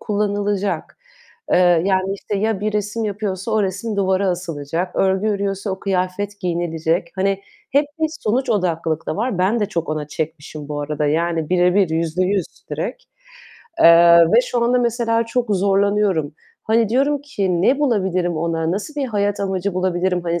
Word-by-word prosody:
kullanılacak. 205 -1 -2 0.5
Eee, 175 -2 +4
yani, 190 0 +1
işte, 200 +1 -4
ya 215 -1 0
bir 215 0 -1
resim 210 +2 -2
yapıyorsa 205 0 -3
o 215 -1 +2
resim 200 +3 -3
duvara 190 0 +1
asılacak. 170 0 -3
Örgü 190 +2 +2
örüyorsa 200 0 -2
o 190 - -3
kıyafet 195 +2 -2
giyinilecek. 170 -1 -1
Hani 195 +1 0 0.3
hep 285 +1 +3
bir 315 - +2
sonuç 245 +5 0
odaklılık 165 -5 -1
da - - -2
var. 225 -3 -1
Ben 205 +5 +2
de 205 - +1
çok 170 -5 -3
ona 155 -1 -3
çekmişim 155 -1 -6
bu 145 -1 -3
arada. 150 0 -2
Yani 165 +1 0
birebir, 180 +1 +3
yüzde 165 +2 0
yüz 190 -1 0 0.2
direkt, - - -4 0.8
eee, 170 0 +8
ve - - +8
şu 240 -1 -1
anda 250 +1 +3
mesela 230 -1 0
çok 235 -3 0
zorlanıyorum. 195 -5 +1 0.3
Hani 225 -1 +2
diyorum 275 +4 +1
ki 190 -11 -1
"Ne 270 +8 +3
bulabilirim 190 - 0
ona? 165 0 -1
Nasıl 215 +10 -4
bir 280 -2 -1
hayat 205 -3 -1
amacı 195 -1 -2
bulabilirim?" 185 -1 0
Hani 170 0 -1
190 Hz, 160 wpm, -20 LUFS, 170-210 Hz, 0.8 s, eee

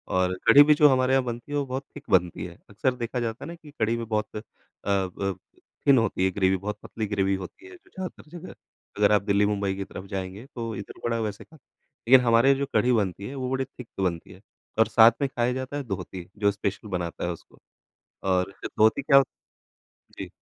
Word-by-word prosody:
और 95 0 +2
कढ़ी 145 - +9
भी 150 +1 +5
जो 150 - +8
हमारे 130 0 +2
यहाँ 135 -1 +3
बनती 120 +3 -6
है 145 - 0
वो 140 - 0
बहुत 130 +1 -4
थिक - - -9
बनती 90 -2 +2
है, 85 -1 -10
अक्सर 110 +6 0
देखा 120 0 -3
जाता 115 -1 -3
है - - -8
ना 170 - -7
कि 155 -3 -15
कढ़ी 110 +1 +1
में 115 - -4
बहुत 105 -1 -2
अ 105 - -4 0.5
अ, 95 0 -1 0.5
थिन 140 -2 +7
होती 100 -4 +1
है, 95 - +2
ग्रेवी 95 0 +2
बहुत 105 +3 -5
पतली 110 -1 -4
ग्रेवी 100 -1 0
होती 95 - -9
है, 375 - -12
जो 385 +2 -22
ज्यादातर 185 -4 -7
जगह 165 - -10 0.4
अगर 105 0 +4
आप 105 -2 +4
दिल्ली-मुंबई 100 -1 +1
की 95 - -4
तरफ 95 - -9
जाएँगे 95 +2 -5
तो 115 -2 -4
इधर 100 - -9
बड़ा 115 -1 0
वैसे 105 -2 -4
ख 160 - -19 0.5
लेकिन 130 +1 +8
हमारे 120 +3 +5
जो 140 +1 -1
कढ़ी 110 +4 +3
बनती 100 -3 -1
है 135 - -7
वो 130 -2 -3
बड़ी 130 0 -1
थिक 125 -2 -12
बनती 90 -3 -2
है, - - -15 0.4
और 110 - +5
साथ 115 0 +7
में 140 - +2
खाया 125 -1 0
जाता 130 +2 -4
है 145 - -3
दोहती, 95 -4 -6
जो 100 -1 +3
स्पेशल 100 +1 -4
बनाता 90 -4 -3
है 90 - -1
उसको 85 - -12 0.7
और 90 +1 +1 0.3
दोहती 110 +6 +4
क्या 140 0 +5
हो 135 - +7 0.9
जी। - - -5
110 Hz, 220 wpm, -26 LUFS, 95-130 Hz, 0.9 s, कढ़ी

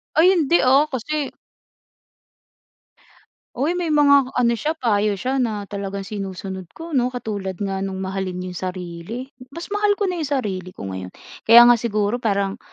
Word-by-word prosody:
Ay, 340 +5 +6
hindi, 340 -2 +3
ah, 270 +4 +5
kasi 285 +2 -3 2.2
Uy, 285 +7 0
may 355 -1 -2
mga 280 -3 +4
ano 240 -1 +3
siya, 300 +7 -1
payo 210 -7 +1
siya 260 +7 -2
na 220 -5 -1
talagang 200 -1 -5
sinusunod 190 -2 -6
ko 330 0 -8
'no, 250 -3 +2
katulad 205 -7 -4
nga 195 0 -3
no'ng 195 -1 -3
mahalin 190 -1 -4
'yong 180 -1 -6
sarili, 180 +8 -7 0.2
mas 335 +8 -9
mahal 415 0 +2
ko 410 - -2
na 350 - -4
'yong 310 - -2
sarili 195 -10 -3
ko - - -9
ngayon, 95 0 -6 0.4
kaya 235 +1 +10
nga 240 -1 +6
siguro 215 +1 -1
parang 200 -3 -1
230 Hz, 160 wpm, -21 LUFS, 195-280 Hz, 2.2 s, kaya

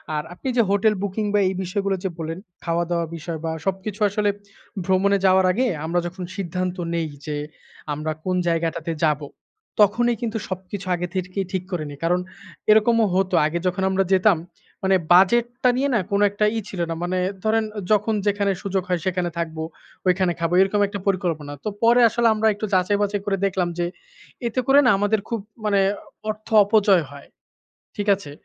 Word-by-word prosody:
আর 150 - -1
আপনি 180 - -8
যে - - +6
hotel 205 +2 +3
booking 205 +2 -2
বা 205 - +4
এই 190 - -1
বিষয়গুলো 195 +2 -1
যে 190 - 0
বললেন, 165 +1 -4 0.2
খাওয়া 170 0 0
দাওয়া 170 -1 +1
বিষয় 165 0 -5
বা 160 - -1
সবকিছু 195 +2 -3
আসলে 205 +1 +1 0.6
ভ্রমণে 195 +2 +3
যাওয়ার 190 0 +5
আগে 250 +7 +1 0.2
আমরা 170 +2 +1
যখন 180 +1 -7
সিদ্ধান্ত 185 -1 -3 0.2
নেই, 165 -1 -1 0.2
যে 150 -1 -3 0.6
আমরা 155 +2 -3
কোন 185 -1 0
জায়গাটাতে 165 0 -1
যাবো। 150 -2 +1 0.5
তখনই 235 +4 +3
কিন্তু 225 -2 -2
সবকিছু 185 +1 -6
আগে 175 0 -3
থেকেই 185 +1 -2
ঠিক 185 -2 -2
করিনি। 155 -5 -4
কারণ 175 +2 +2 0.5
এরকমও 225 +1 +5
হত। 190 0 +1
আগে 165 +3 -1
যখন 180 +1 -1
আমরা 190 0 +2
যেতাম 190 0 +4 0.5
মানে, 190 0 +4 0.2
বাজেটটা 240 +7 +4
নিয়ে 280 +2 +1
না 225 - +3
কোন 200 0 +2
একটা 205 +1 0
ই - - +1
ছিল 190 - -7
না। 165 - -2
মানে 180 +1 -1 0.3
ধরেন 220 +1 +2 0.3
যখন 215 +1 +3
যেখানে 200 0 +2
সুযোগ 195 -1 -1
হয় 180 -1 +1
সেখানে 180 -1 0
থাকবো, 160 -1 -3 0.4
ঐখানে 180 -1 +2
খাবো। 165 +1 -1
এরকম 195 +2 +2
একটা 200 0 -5
পরিকল্পনা। 165 -6 -1
তো - - -1
পরে 240 +2 +6
আসলে 235 +1 +2
আমরা 220 0 +1
একটু 210 +2 -4
যাচাই 190 +2 +3
বাচাই 205 0 0
করে 200 -1 0
দেখলাম 185 -2 0
যে 175 - +1 0.6
এতে 235 - -2
করে 275 +1 +7
না - - +6
আমাদের 205 +2 +1
খুব 230 - -1 0.3
মানে, 200 -2 +3 0.5
অর্থ 215 0 -5 0.2
অপচয় 200 -4 +4
হয়। 140 0 -12 0.7
ঠিক 205 - -3
আছে? 150 -7 -10
190 Hz, 180 wpm, -23 LUFS, 175-210 Hz, 0.7 s, করে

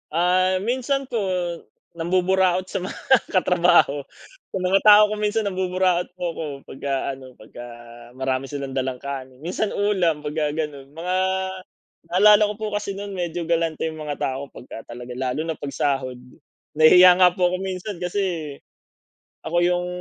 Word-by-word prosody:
Ah, 180 +3 +2
minsan 260 +4 -1
po, 245 -3 -3 0.7
nambuburaot 185 +2 +1
sa 185 - -4
mga 185 - -6 0.3
katrabaho. 175 -6 +3 0.5
Sa - - -4
mga 185 +1 +2
tao 210 0 +8
ko - - 0
minsan 210 +1 0
nambuburaot 185 -2 0
po 175 -2 -3
ako 165 - -5 0.2
pagka 135 0 -3
ano, 130 -1 -13
pagka 120 +3 -11 0.5
marami 130 0 -2
silang 140 -2 -5
dalang 130 -1 -2
kanin, 130 -1 -7
minsan 185 +5 -2
ulam 180 -7 +1
pagka 150 0 -2
gano'n. 150 -4 -4
Mga 170 +4 -3 0.9
naalala 205 +4 +6
ko - - -3
po 220 - -4
kasi 205 -1 -3
no'n 200 0 -6
medyo 175 -2 -3
galante 165 -1 0
yung 160 0 -7
mga 150 -1 -4
tao 135 +2 -3
pagka 115 - -11
talaga 125 0 -8
lalo 130 +4 -2
na 165 -1 -3
'pag 145 - -5
sahod. 135 -3 -1 0.6
Nahihiya 180 +4 +7
nga 180 -1 +7
po 180 -2 +2
ako - - 0
minsan 190 0 -5
kasi, 180 -5 -3 0.9
ako 165 +2 -2
yung 180 0 +1
175 Hz, 155 wpm, -23 LUFS, 145-185 Hz, 0.9 s, tao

